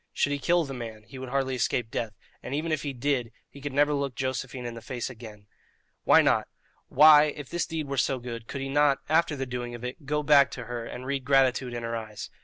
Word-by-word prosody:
Should 145 - +1
he 145 - -1
kill 170 +4 +2
the 135 - -6
man, 115 -4 -7
he 120 +4 -11
would 130 -1 -6
hardly 135 0 0
escape 120 -2 -1
death, 110 -3 -3 0.3
and 135 - -4
even 160 +2 -2
if 155 - 0
he 145 - -3
did, 130 -2 -1 0.2
he 140 - -14
could 145 +1 -4
never 145 +2 +3
look 140 -3 -2
Josephine 130 -1 -3
in 120 - -4
the 115 - -9
face 125 +1 -4
again. 110 -4 -12 0.6
Why - - +7
not? - - +2 0.4
Why, 150 -1 +8
if 145 -2 -5
this 175 -3 -1
deed 160 -3 -3
were 140 0 -3
so 130 +2 +1
good, 120 -2 -7
could 140 - -5
he 135 - -4
not, 145 0 +3
after 160 -1 +3
the 135 -1 -3
doing 120 -1 -5
of 120 - -10
it, 135 +4 -7
go 150 +1 0
back 140 -2 +6
to 125 - -5
her 120 -1 -5
and 125 - -7
read 135 0 -2
gratitude 130 -2 +2
in 120 - -4
her 115 0 -3
eyes? 110 -3 -7
130 Hz, 245 wpm, -27 LUFS, 120-145 Hz, 0.6 s, Why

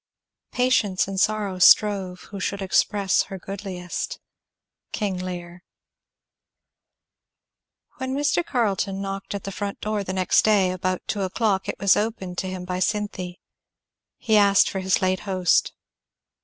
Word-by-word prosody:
Patience 235 -8 +2
and 195 -1 -3
sorrow 205 -3 0
strove 190 -1 +4
Who 200 - -6
should 200 +2 -2
express 195 +1 +2
her 195 - -6
goodliest. 190 - -5 0.7
King 205 -4 -2
Lear. 175 -1 -6 2.4
When 260 0 -3
Mr. 290 +4 +1
Carleton 200 - -1
knocked 195 0 -5
at 200 - -5
the 195 - -5
front 200 +1 -5
door 215 -1 -2
the 185 - -4
next 185 -1 +3
day 200 -4 +3
about 185 0 -2
two 205 - -2
o'clock 195 +1 0
it - - -3
was 200 0 +4
opened 200 -5 -2
to 190 - -3
him 185 -1 -6
by 180 0 -3
Cynthy. 190 -3 -2 0.8
He 220 -3 +2
asked 200 -1 +5
for 190 - -3
his 190 0 +1
late 185 0 +1
host. 185 -4 +1
195 Hz, 140 wpm, -24 LUFS, 185-210 Hz, 2.4 s, asked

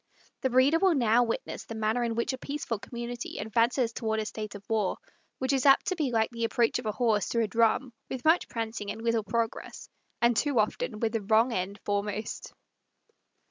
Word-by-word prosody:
The 260 - +1
reader 260 +6 +4
will 375 -3 +4
now 235 -2 +4
witness 230 -1 -3
the 225 - -7
manner 220 +2 0
in 230 -1 -1
which 235 +3 0
a - - -4
peaceful 275 -6 -4
community 240 +2 -6
advances 230 +3 +1
toward 220 -2 -1
a 215 - -2
state 215 -1 -6
of 200 0 -11
war; 215 -4 0 0.4
which 260 +1 0
is 270 +1 +2
apt 275 - +6
to 370 - -1
be 305 -6 0
like 225 -1 +1
the 230 -1 -4
approach 230 +1 +2
of 240 - -5
a - - +1
horse 215 -4 +1
to 235 - 0
a 225 - +2
drum, 230 +3 +2 0.2
with 260 +1 -5
much 320 +3 +4
prancing 225 -2 -4
and 225 - -5
little 230 -1 +1
progress, 225 +2 -3 0.3
and 235 0 +3
too 285 +2 +1
often 215 0 -1
with 225 -1 +1
the 225 -1 -1
wrong 220 +4 +3
end 190 +1 -3
foremost. 205 +1 -3
230 Hz, 205 wpm, -28 LUFS, 215-245 Hz, 0.4 s, apt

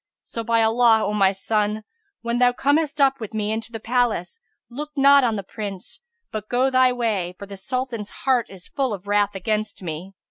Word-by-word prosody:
So 230 - -6
by 230 0 +2
Allah, 225 0 +4
O 205 - -1
my 195 -2 +4
son, 210 +2 -1 0.4
when 235 +1 -1
thou 245 0 +4
comest 290 +3 +1
up 275 -1 +4
with 220 -1 -7
me 210 0 -1
into 225 +1 -4
the 225 - -5
palace, 240 - 0 0.3
look 295 +5 -6
not 280 0 +6
on 230 -3 +1
the 200 - -4
Prince, 195 -1 -7 0.3
but 215 -1 -5
go 255 +2 +2
thy 255 0 +5
way; 210 -8 -1
for 200 - -8
the 200 0 -9
Sultan's 240 0 -4 0.2
heart 255 -4 +2
is 185 -2 -10
full 265 -6 -1
of 195 0 -14
wrath 205 0 +1
against 210 +1 -2
me." 170 +3 -6
225 Hz, 200 wpm, -23 LUFS, 205-250 Hz, 0.4 s, not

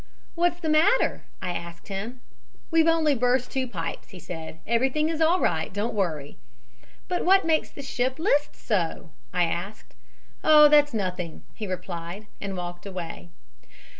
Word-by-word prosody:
"'What 345 0 +2
is - - -22
the 325 - -2
matter?' 315 +11 +3 0.2
I 180 - -1
asked 170 0 -7
him. 215 +6 -5 0.5
"'We've 325 0 +4
only 325 -3 +4
burst 250 0 +1
two 260 -1 -1
pipes,' 165 -8 -5
he 190 - -11
said. 160 -2 -7
'Everything 265 +7 +1
is 325 -1 -2
all 335 +3 +4
right, 160 - 0
don't 205 +4 -2
worry.' 160 -9 -2 0.7
"'But 360 -1 -1
what 385 +1 +5
makes 320 -1 +2
the 280 - -9
ship 260 -1 -1
list 315 -4 +1
so?' 170 -5 -2 0.2
I 180 -1 +2
asked. 175 +5 -4 0.5
"'Oh, 300 -1 +8
that's 295 -3 +5
nothing,' 180 -5 -3
he 215 - -6
replied, 180 +1 -5 0.2
and 195 -2 -4
walked 175 +1 -6
away. 175 -2 -7
215 Hz, 160 wpm, -26 LUFS, -, 0.7 s, Oh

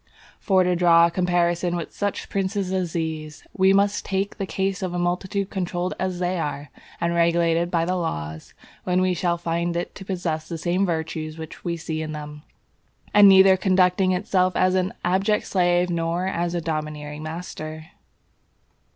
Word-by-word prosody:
For 190 -3 +3
to 180 0 +1
draw 170 -1 +6
a 170 - 0
comparison 175 0 +1
with 170 -2 -5
such 205 -1 -3
princes 195 -1 -2
as 180 -3 -1
these, 155 -3 -4
we 190 0 +4
must 200 +1 +2
take 195 +1 -2
the 195 - -3
case 190 0 -2
of 180 -2 -3
a - - -1
multitude 185 +3 -1
controlled 180 -1 -2
as 185 -1 -2
they 180 0 -1
are, 145 -2 -4 0.3
and 170 0 0
regulated 170 0 +2
by 170 -2 +1
the 180 +2 0
laws, 80 - -4 0.3
when 180 0 +1
we 185 0 +2
shall 175 0 0
find 170 0 -2
it 175 - -4
to 195 - -10
possess 175 -5 -3
the 165 - -4
same 180 +4 0
virtues 160 -1 -3
which 160 -1 -9
we 170 -1 -2
see 160 -1 -4
in 155 0 -5
them, 150 0 -8 0.7
and 205 -1 +8
neither 190 0 +7
conducting 185 -1 +3
itself 185 -1 +1
as 185 0 +3
an 185 0 +1
abject 195 +4 +1
slave 175 -1 +2
nor 170 +1 -1
as 175 -2 -1
a 170 - -1
domineering 150 -2 -4
master. 155 0 -7
175 Hz, 175 wpm, -23 LUFS, 165-185 Hz, 0.7 s, and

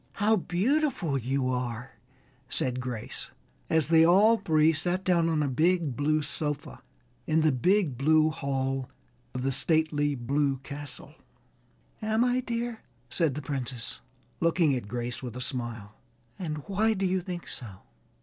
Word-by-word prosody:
"How 215 +2 +3
beautiful 205 - 0
you 130 +1 0
are," 125 -1 -3 0.6
said 125 0 -1
Grace 125 -3 -5 0.4
as 160 -2 +2
they 160 -1 +6
all 200 +7 +6
three 160 -4 +3
sat 175 +4 -1
down 170 -3 +3
on 155 -2 +1
a - - 0
big 160 +1 +1
blue 155 +2 +1
sofa 150 0 -4 0.5
in 160 +1 +3
the 155 -1 +4
big 150 - +2
blue 155 +2 +4
hall 135 -2 -2 0.5
of 125 - -2
the 135 - +1
stately 145 0 +1
blue 140 +3 0
castle. 145 -1 -5 0.9
"Am 220 +2 +2
I, 250 0 +2
dear?" 235 -2 -3 0.3
said 155 -3 +1
the 150 - -5
Princess, 125 -3 -4 0.4
looking 165 -3 +3
at 125 -6 -3
Grace 120 +2 -4
with 125 -3 -6
a - - -5
smile, 120 -5 -2 0.5
"and 155 -5 -4
why 215 +3 +1
do 195 0 -1
you 185 0 +1
think 175 -1 -6
so?" 105 -7 -8
150 Hz, 150 wpm, -28 LUFS, 130-180 Hz, 0.9 s, they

